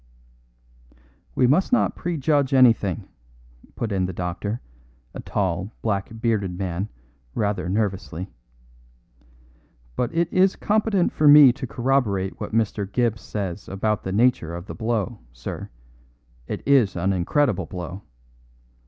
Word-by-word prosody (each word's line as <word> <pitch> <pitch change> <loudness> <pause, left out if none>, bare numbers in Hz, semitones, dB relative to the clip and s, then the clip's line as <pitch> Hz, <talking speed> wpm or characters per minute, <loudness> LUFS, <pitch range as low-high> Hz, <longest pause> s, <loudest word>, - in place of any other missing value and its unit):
"We - - +3
must 155 - +3
not 250 - +2
prejudge 145 -4 0
anything," 115 -8 +3 0.7
put 115 -2 -3
in 95 -2 0
the 95 - -5
doctor, 90 +6 -3 0.5
a - - -7
tall, 95 +1 -2
black 100 -3 -1
bearded 105 -6 0
man, 95 +1 -3 0.5
rather 100 -4 -1
nervously; 95 -3 -2 1.7
"but 125 - -1
it 170 0 +1
is 185 +1 +4
competent 210 -3 +1
for 150 - +3
me 145 -3 +9
to 130 0 -6
corroborate 120 -7 0
what - - -5
Mr. 105 -3 -1
Gibbs 120 -3 0
says 100 -2 -5
about 105 +1 -1
the 95 - -4
nature 100 -6 +2
of 85 +1 -7
the - - -7
blow, 115 -1 -2
sir; - - -7 0.8
it - - -5
is 130 -8 +4
an 95 +2 0
incredible 95 - +1
blow. 90 +2 -6
105 Hz, 125 wpm, -23 LUFS, 95-130 Hz, 1.7 s, me